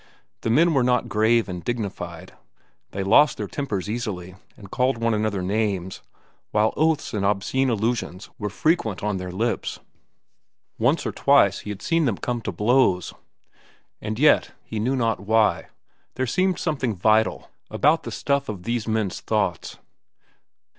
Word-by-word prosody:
The - - -2
men 160 +8 +4
were 135 - +3
not 125 -1 +1
grave 110 +2 +2
and 90 -2 -6
dignified. 115 -5 -5 0.6
They 100 - -4
lost 130 +10 +5
their - - -3
tempers 105 -10 -4
easily 105 -6 -4 0.2
and 100 -5 -13
called 130 0 +1
one 115 0 0
another 105 -3 -1
names, 95 -2 -2 0.5
while 105 +1 +2
oaths 160 0 +1
and 105 -2 -1
obscene 105 +7 +1
allusions 110 -4 -2
were 105 - -2
frequent 110 - 0
on 105 -2 -1
their 90 -1 -5
lips. 115 +6 -2 1.0
Once 130 +8 +2
or - - -1
twice 140 -9 +3
he - - -9
had 105 -1 -6
seen 165 -1 +2
them 115 -7 0
come 120 -1 -3
to - - -3
blows. 105 -5 +2 0.9
And 110 0 -4
yet, 150 +3 +4
he 110 - -5
knew 125 +5 0
not 115 -4 0
why, 110 +2 +2 0.5
there 130 - -1
seemed 185 +8 +1
something 135 -9 -1
vital 110 +4 +1 0.2
about 155 +4 +2
the - - -7
stuff 140 -2 -1
of 100 -5 -6
these 115 +1 -2
men's 110 -4 -1
thoughts. 100 -5 -2
110 Hz, 155 wpm, -23 LUFS, 100-130 Hz, 1.0 s, lost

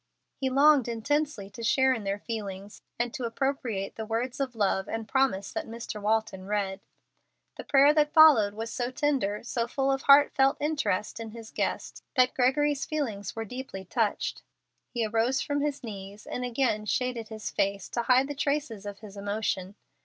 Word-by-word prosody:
He 265 - -2
longed 280 -1 +5
intensely 235 -1 -1
to 230 - -9
share 265 +3 +3
in 225 -5 -5
their 195 +1 -1
feelings, 205 -3 -6 0.2
and 240 0 -1
to 255 - -5
appropriate 230 -5 -2
the 220 - -4
words 235 +4 -2
of 265 -3 -2
love 195 -2 0
and 225 -1 -4
promise 265 -8 +1
that - - -3
Mr. 230 -2 -6
Walton 210 -3 -1
read. 200 -2 -1 0.7
The - - -7
prayer 280 +1 +5
that 300 -1 +3
followed 275 -11 +7
was 225 +1 -5
so 245 0 -2
tender, 255 -7 0
so 235 0 -2
full 270 +2 0
of 270 0 0
heart 285 +1 +7
felt 270 +1 +3
interest 230 -10 -1
in 225 -1 -6
his 225 0 -10
guest, - - -3
that 255 -1 +4
Gregory's 280 +3 +2
feelings 230 -11 -3
were 225 0 -3
deeply 235 -5 -7
touched. 215 +2 -1 0.5
He 235 -3 -1
arose 230 +5 +1
from 285 0 -1
his 290 -2 -2
knees, 200 -2 -8
and 250 - -4
again 240 -4 0
shaded 245 -1 -1
his 215 -1 -6
face 200 0 -1
to 235 - -1
hide 255 +3 +4
the 290 - -4
traces 280 -7 -2
of 200 0 -8
his 210 -2 -11
emotion. 200 -1 -2
230 Hz, 180 wpm, -28 LUFS, 210-270 Hz, 0.7 s, followed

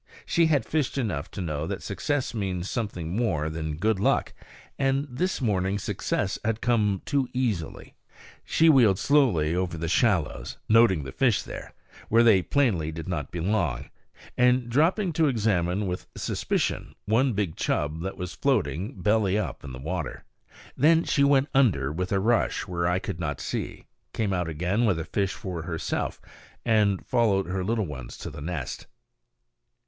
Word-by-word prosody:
She 170 -1 +3
had 150 -4 +2
fished 150 -3 -1
enough 95 - -2
to - - -6
know 80 -2 -3
that - - -4
success 145 -4 -2
means 95 -4 -2
something 95 -8 -3
more 90 -10 0
than 80 -1 -3
good 105 +3 +1
luck; - - +1 0.5
and 135 +1 +1
this 160 +9 -2
morning 100 -4 +1
success 100 0 -2
had 110 0 0
come 105 -6 +1
too 140 -3 0
easily. 110 - -2 0.5
She 165 - +3
wheeled 120 - +6
slowly 100 - +3
over 90 -2 -1
the 85 +1 -3
shallows, 85 - +1
noting 110 -8 +5
the 65 - -7
fish 125 - +2
there, - - -9 0.3
where 115 +2 +5
they 110 -5 +6
plainly 95 - +1
did 80 0 -7
not 80 -6 -3
belong, 85 - -1 0.4
and 125 -1 +3
dropping 170 - +2
to 160 -1 +3
examine 105 -6 +1
with 90 -1 -4
suspicion - - -2
one 120 +4 +2
big 100 -6 -1
chub 75 +2 -1
that 95 +2 -4
was 90 -2 -5
floating, 105 - -1
belly 105 -2 +2
up, 105 - -3
on 70 - -7
the 65 - -7
water. 80 +3 -4 0.5
Then 160 +4 +4
she 140 - +2
went 140 0 +4
under 90 - +3
with 90 +4 -3
a 100 - +2
rush, 115 +4 +1
where 85 -2 -1
I 90 0 +2
could 90 -3 -5
not 75 -5 -3
see, - - -4 0.3
came 105 -3 -1
out 90 -2 -1
again 90 +9 0
with 100 -6 +2
a 80 - -4
fish 100 -2 -1
for 90 -4 -5
herself, 80 0 -3 0.5
and 105 -4 +2
followed 110 -6 +2
her 95 +1 -2
little 110 +1 0
ones 65 -6 -8
to - - -7
the - - -9
nest. 75 -4 -5
100 Hz, 165 wpm, -26 LUFS, 85-120 Hz, 0.5 s, wheeled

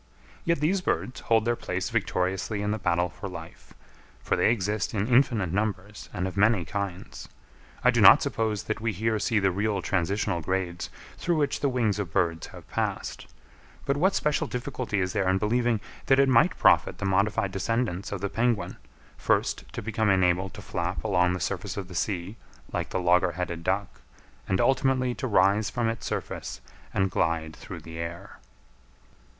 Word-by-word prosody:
Yet 170 -4 +1
these 180 +5 +2
birds 130 -7 -2
hold 110 -1 +2
their 120 0 +2
place 90 -4 -3
victoriously 95 +3 -1
in 105 - 0
the 110 - -2
battle 90 -1 +1
for 90 +3 -8
life; 85 -2 -11 0.5
for - - +1
they - - +3
exist 105 -1 -1
in 100 -1 +1
infinite 120 -8 +3
numbers 105 0 -3
and 90 +1 -2
of 95 - -6
many 100 -3 +3
kinds. 100 -3 -5 0.5
I - - +6
do - - +2
not - - +9
suppose 110 -2 -1
that 110 0 -3
we 115 -1 0
here 110 +3 0
see 110 - +1
the 95 -2 +3
real 100 +2 0
transitional 95 0 0
grades 90 +1 -2 0.3
through 175 - +1
which 145 -2 0
the 140 - +1
wings 115 -6 0
of 95 -5 -3
birds 85 -1 0
have - - -13
passed; - - -3 0.6
but 140 - +1
what 190 +7 +2
special 150 -1 +1
difficulty 125 -4 -3
is 95 -1 -1
there 100 -4 +1
in 95 - +3
believing 115 +2 +1 0.3
that 135 - +5
it 135 0 +5
might 120 -3 +4
profit - - +4
the - - -4
modified 100 +1 +1
descendants 100 -1 -1
of 100 -3 -4
the 100 - 0
penguin, 110 -5 0 0.4
first - - 0
to - - -6
become 110 0 0
enabled 95 -1 +2
to - - -9
flap 85 +2 -3
along 90 -4 +2
the 90 - -3
surface 100 +1 -3
of 100 -2 -4
the 90 - -10
sea 90 +3 -2 0.4
like - - -2
the - - -1
logger 90 0 +3
headed 85 -1 -4
duck, 95 +2 -2 0.5
and 95 0 +1
ultimately 130 -2 +2
to 130 - -4
rise 100 0 +3
from 120 -2 -1
its 115 -2 -3
surface - - -4 0.3
and 95 -1 +1
glide 80 -2 0
through - - -9
the 80 0 -9
air? 85 +1 -7
100 Hz, 180 wpm, -27 LUFS, 90-115 Hz, 0.6 s, not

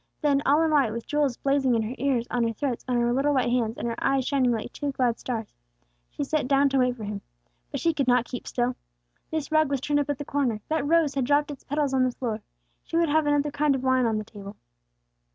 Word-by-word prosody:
Then, 285 -2 +2
all 295 +4 +4
in 320 - +1
white, 275 -7 +3
with 230 0 -5
jewels 290 -4 0
blazing 275 -3 +2
in 225 - +1
her 220 +3 -4
ears, 255 -3 +1
on 245 - 0
her 230 - -2
throat, 250 +1 -3
on 250 -1 +1
her 240 0 +2
little 280 +3 +2
white 250 -2 +1
hands, 235 -2 0
and - - -3
her 230 0 -4
eyes 270 -2 +2
shining 265 -4 +2
like 225 -2 -3
two 290 -1 -3
glad 245 -3 0
stars, 225 -4 -4 0.6
she - - -4
sat 290 -1 -1
down 275 +1 +4
to 270 0 +1
wait 250 -1 +2
for 220 - -7
him. 205 -1 -5 0.5
But - - -4
she 330 - +2
could 275 -4 -1
not 250 -1 +4
keep 250 - -7
still. 245 0 -1 0.5
This 315 -1 -3
rug 310 -2 +3
was 280 -1 0
turned 290 +2 0
up 290 0 -2
at 290 - -1
the 290 - -6
corner; 265 -7 0
that 310 -2 0
rose 325 -2 +3
had 270 -2 0
dropped 290 +2 +2
its 280 - -10
petals 290 -1 -1
on 260 -1 +3
the 255 - +2
floor. 230 -3 -4 0.4
She 330 - -3
would 335 -2 +3
have 310 0 +2
another 290 0 +2
kind 290 -1 +2
of 260 - -4
wine 260 -2 +3
on 220 -1 0
the 215 - -3
table. 205 -1 -10
270 Hz, 260 wpm, -26 LUFS, 240-290 Hz, 0.6 s, all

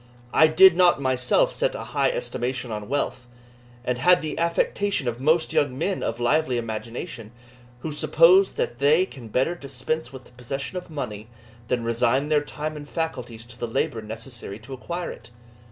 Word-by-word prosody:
I 160 - +7
did 180 +3 +7
not 175 -4 +5
myself 130 - +2
set - - 0
a - - -5
high - - +1
estimation 125 - -3
on 105 0 -5
wealth, 130 -3 -2 0.6
and 125 -1 -1
had 180 +4 +5
the 155 - -3
affectation 170 -1 0
of 120 0 -2
most 160 +3 +2
young 135 -3 +1
men 185 +6 -1
of 115 +1 -2
lively 130 +1 +2
imagination, 115 0 -5 0.5
who 160 - -4
suppose 170 +6 +5
that 120 - -3
they 150 +6 +4
can 130 -10 -11
better 130 +9 +1
dispense 140 0 -4
with 130 -1 -10
the - - -19
possession 130 +6 -6
of 180 -1 -5
money, 110 -8 -5 0.4
than 120 -1 0
resign 120 +5 +1
their 150 -1 +3
time 150 +1 -5
and 145 -1 -9
faculties 125 -9 -4
to 120 0 -14
the 120 - -2
labour 115 0 -1
necessary 115 -1 -6
to 120 +5 -11
acquire 170 +7 -5
it. 115 - -12
135 Hz, 175 wpm, -24 LUFS, 120-160 Hz, 0.6 s, I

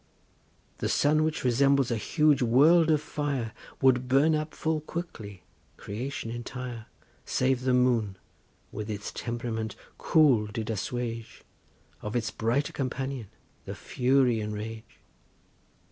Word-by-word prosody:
The - - -1
sun, 155 +2 +3
which 155 0 -1
resembles 135 +1 +3
a - - +2
huge 150 +5 +2
world 155 +8 +5
of 155 -2 +3
fire, 140 -7 -3 0.3
Would 125 -1 +4
burn 140 +5 +4
up 155 0 -2
full 160 -1 -1
quickly 110 - -7 0.3
creation 115 +2 -5
entire 120 -1 -6 0.4
Save 130 -1 +1
the 130 0 +1
moon 115 -6 +2 0.5
with 105 0 -6
its 105 -1 -4
temp'rament 115 -2 -4 0.2
cool 135 -9 +4
did 110 +1 -4
assuage 115 +2 -4 0.6
Of 105 +2 -5
its 110 -3 -1
brighter 115 +7 0
companion 130 -3 -3 0.4
the - - -6
fury 125 -2 +2
and 105 0 -4
rage. 110 +1 -8
125 Hz, 125 wpm, -28 LUFS, 110-140 Hz, 0.6 s, world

